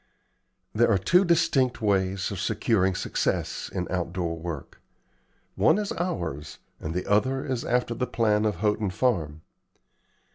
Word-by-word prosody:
There 115 +2 +3
are 105 - +4
two 175 - +4
distinct 165 -8 +2
ways 95 -2 0
of 100 - -4
securing 95 -2 +1
success - - -2
in 90 - -2
outdoor 85 -2 -2
work. 80 -4 -7 0.7
One - - +4
is 210 -1 -2
ours, 85 - -3 0.2
and 80 +1 -5
the 90 - -2
other 130 +6 +1
is 130 -3 -2
after 125 -1 0
the 125 +2 -2
plan 110 -3 +1
of 105 -3 +1
Houghton 105 +2 0
Farm. 85 -8 -1
105 Hz, 140 wpm, -26 LUFS, 90-125 Hz, 0.7 s, are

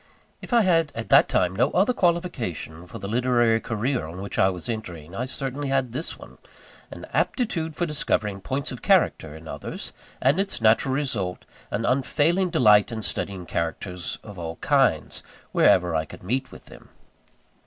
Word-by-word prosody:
If - - -10
I 235 -1 +5
had 165 -5 +3
at 115 - -5
that - - +6
time 90 0 +1
no 125 +7 +3
other 200 +7 +3
qualification 125 - -1
for - - -8
the 100 - -6
literary 120 0 +2
career 115 - -1
on 85 +3 -8
which 100 +1 -4
I 95 - +5
was 90 -3 -5
entering, 90 -8 -6
I 120 +6 -3
certainly 135 +2 -4
had 135 -3 0
this 145 +8 -3
one - - -14 0.5
an - - -9
aptitude 165 - 0
for 175 - 0
discovering 105 - -1
points 140 +8 -3
of 125 - -7
character 80 -1 +2
in 80 0 -11
others: - - -6 0.3
and 140 +7 +3
its 195 0 -1
natural 115 +4 +3
result, 110 -11 -2 0.2
an 115 +3 -2
unfailing 150 +8 +2
delight 110 - +5
in 110 -2 -4
studying 95 -3 -3
characters 85 +2 -3
of 100 -4 -10
all 80 -1 -5
kinds, - - +1 0.3
wherever 90 -2 +4
I 80 0 0
could - - -12
meet 130 +8 -1
with - - -13
them. - - -15
115 Hz, 175 wpm, -25 LUFS, 95-145 Hz, 0.5 s, that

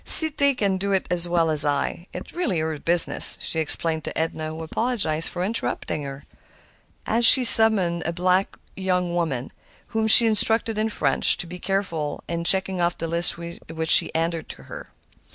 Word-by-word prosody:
"'Cité 285 -4 +6
can 200 -4 -2
do 200 +1 -5
it 190 - -2
as 175 -1 +1
well 165 -2 -1
as 150 -2 +3
I; 145 +4 -4
it - - -10
is - - -19
really 240 - -4
her 160 -1 -5
business," 170 +2 +4
she 160 - -3
explained 160 0 -1
to - - -8
Edna, 160 -1 -5
who 160 +1 -10
apologized 180 -5 -3
for 175 - -6
interrupting 200 -6 -5
her. 140 0 -10 0.8
And 230 +2 -2
she 255 +3 +8
summoned 210 -7 +4
a - - -11
young 170 - -5
black 185 +2 -2 0.2
woman, 175 -8 -4 0.4
whom 220 -1 -3
she 230 +2 +8
instructed, 225 0 +1
in 220 +1 -3
French, - - 0
to - - -5
be 180 +1 -11
very - - -13
careful 170 -7 -5
in 170 0 -6
checking 190 +1 +1
off 175 0 -2
the 165 - -7
list 170 +1 +2
which 165 -1 -9
she - - +5
handed 165 0 -5
her. - - -13
175 Hz, 185 wpm, -20 LUFS, 160-205 Hz, 0.8 s, she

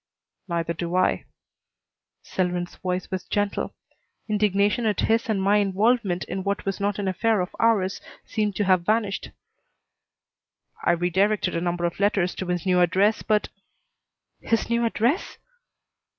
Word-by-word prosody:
"Neither 170 -1 -1
do 170 +1 -4
I." 185 - +2 1.0
Selwyn's 180 -1 -2
voice 185 0 -3
was 185 -1 -3
gentle. 205 -1 -1 0.5
Indignation 210 +1 +2
at 210 - +1
his 230 +2 +1
and 210 -3 +1
my 200 +2 +3
involvement 205 -1 +1
in 190 - -4
what 200 +1 -2
was 195 0 -2
not 200 0 0
an 200 -2 -2
affair 215 +3 +1
of 180 0 -3
ours 205 -4 +2 0.2
seemed 210 -2 -1
to 205 - +1
have 185 -2 +3
vanished. 210 0 0 1.5
"I - - +4
redirected 185 +3 +1
a 170 - -1
number 175 0 -1
of 170 +1 -3
letters 200 -3 +2
to 185 - -4
his 180 0 -2
new 180 -1 +3
address, 190 +5 +3
but 215 -1 +1 0.5
" - - -57
"His 230 0 +1
new 235 0 +2
address?" 235 - 0
195 Hz, 150 wpm, -24 LUFS, 180-210 Hz, 1.5 s, I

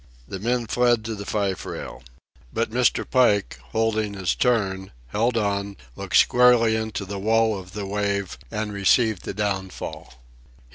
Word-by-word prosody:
The 95 - -6
men 120 +3 0
fled 120 0 +2
to 115 - -3
the 100 -1 -7
fife 100 -3 -1
rail. - - -7 0.5
But 115 -1 -1
Mr. 125 +1 +1
Pike, 105 - +2
holding 110 +4 -1
his 95 -2 0
turn, 95 - 0 0.2
held 115 - +1
on, 100 -2 -1 0.2
looked - - 0
squarely 120 -2 +5
into 110 -2 -3
the 100 +1 -5
wall 110 +1 +2
of 90 -1 -12
the 105 -1 -4
wave, 100 -5 -2
and 105 - -3
received 100 0 +2
the - - -4
downfall. 95 -2 -4
105 Hz, 150 wpm, -24 LUFS, 100-115 Hz, 0.5 s, squarely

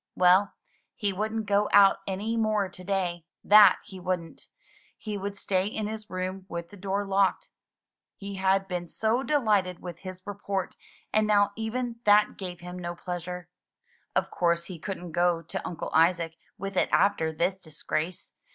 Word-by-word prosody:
Well, 185 +2 +4 0.4
he 205 -2 0
wouldn't 215 +3 -2
go 205 0 +2
out 200 -1 +7
any 205 +4 -2
more 215 -3 +1
to 185 - -11
day, 180 -3 -1 0.2
that 205 -2 +8
he 190 - -10
wouldn't; 180 -2 -4 0.5
he 215 -2 -5
would 200 0 -4
stay 190 -1 0
in 215 0 -3
his 215 0 -6
room 185 +1 -4
with 170 +1 -6
the - - -11
door 200 +1 -2
locked. 195 -1 +1 0.7
He 200 -1 -7
had 195 0 +2
been 180 -2 -3
so 225 +8 0
delighted 215 - +1
with 175 -2 -8
his 185 -1 -9
report, 200 -2 -3 0.4
and 215 0 +3
now 205 -1 +4
even 230 +2 -3
that 210 0 +5
gave 180 -3 -6
him 180 +1 -7
no 175 -1 -4
pleasure. 180 0 -6 0.7
Of - - +1
course 170 -1 +1
he 175 -2 -8
couldn't 180 -1 -6
go 175 0 +2
to 165 - -5
Uncle 170 - -5
Isaac 165 0 +3 0.2
with 195 0 -5
it - - +3
after 200 -6 +3
this 175 +4 -1
disgrace. 160 +1 -4
190 Hz, 165 wpm, -27 LUFS, 180-205 Hz, 0.7 s, that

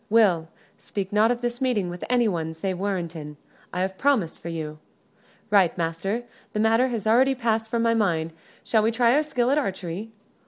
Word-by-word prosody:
"Will, 195 -7 +4 0.3
speak 195 -1 -5
not 215 +2 +4
of 245 0 0
this 240 0 -3
meeting 240 -8 +1
with 175 0 -6
anyone 185 -10 +1
save 185 +2 -3
Warrenton. 170 -6 -3 0.3
I 180 - -2
have 190 0 -2
promised 255 - +1
for 170 - -7
you." 155 -2 -5 0.7
"Right, 190 -5 +4
master; 175 +7 -2 0.3
the 210 - -1
matter 225 +4 +4
has 230 -5 -3
already 255 +5 +4
passed 225 -3 0
from 230 0 0
my 230 0 +3
mind. 165 -7 0 0.3
Shall 220 - +2
we 220 - +2
try 235 +1 +3
our 295 - +4
skill 260 -5 0
at 290 - +3
archery? 195 - -4
210 Hz, 185 wpm, -25 LUFS, 175-235 Hz, 0.7 s, Will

